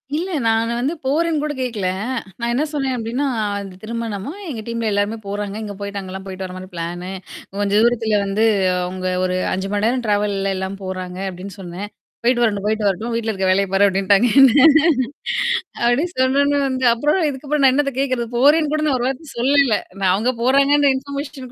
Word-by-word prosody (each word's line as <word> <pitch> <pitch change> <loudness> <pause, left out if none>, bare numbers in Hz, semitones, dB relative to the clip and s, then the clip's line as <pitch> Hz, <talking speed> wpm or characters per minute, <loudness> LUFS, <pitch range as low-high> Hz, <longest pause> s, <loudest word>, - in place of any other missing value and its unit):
இல்ல. 345 +5 -2 0.2
நானு 225 +1 +1
வந்து 270 +6 0
போரேன்னு 310 +2 +1
கூட 300 -1 -2
கேட்கல. 225 -7 -2 0.5
நான் 235 0 -1
என்ன 280 +5 +1
சொன்னேன் 270 -3 -1
அப்டின்னா, 240 +5 -2 0.4
இந்த 190 -2 -10
திருமணம்மா, 225 - -4 0.2
எங்க 225 -6 -5
டீம்ல 230 -1 -2
எல்லாருமே 205 +2 0
போறாங்க. 205 0 -4
இங்க 205 - -6
போயிட்டு 200 0 -4
அங்கலாம் 190 0 -8
போய்ட்டு 190 0 -6
வர 180 - -8
மாரி 185 0 -9
பிளானு. 175 +2 -5 0.5
கொஞ்சம் 205 +1 +2
தூரத்தல 225 -3 +2
வந்து 195 +3 0 0.4
அவங்க 185 0 -4 0.2
ஒரு 185 0 0 0.2
5 190 +1 -3
மணி 205 +1 +1
நேரம் 245 0 0
ட்ராவல்லல்ல 205 -2 0
எல்லாம் 190 +1 -4
போறாங்க 185 -1 -5
அப்டின்னு 185 +1 -9
சொன்னேன். 190 +3 -7 0.3
"போயிட்டு 240 0 +3
வரட்டும் 205 -3 0
போயிட்டு 215 -1 +1
வரட்டும். 220 +5 -1
வீட்ல 225 -1 -1
இருக்க 190 -1 -1
வேலைய 195 +1 +2
பாரு" 200 +1 +5
அப்டின்ட்டாங்க 195 +4 +3
என்ன. 270 - +8 1.3
அப்டின்னு 295 +9 +1
சொன்னோன 280 +2 +2
வந்து 260 -1 -2
அப்புறம் 295 +10 +1
இதுக்கப்புறம் 285 +1 -2
நான் 260 - +6
என்னத்த 275 0 +1
கேட்கறது. 255 -4 -1
போரேன்னு 295 +4 +4
கூட 310 - 0
நான் 265 -3 +2
ஒரு 245 - 0
வார்த்த 270 +3 -5
சொல்லல. 270 -3 +3 0.2
நான் 185 -2 +3
அவங்க 225 +6 +1
போறாங்கன்ற 280 +2 +4
இன்ஃபர்மேஷன் 280 -1 -7
225 Hz, 180 wpm, -20 LUFS, 195-270 Hz, 1.3 s, என்ன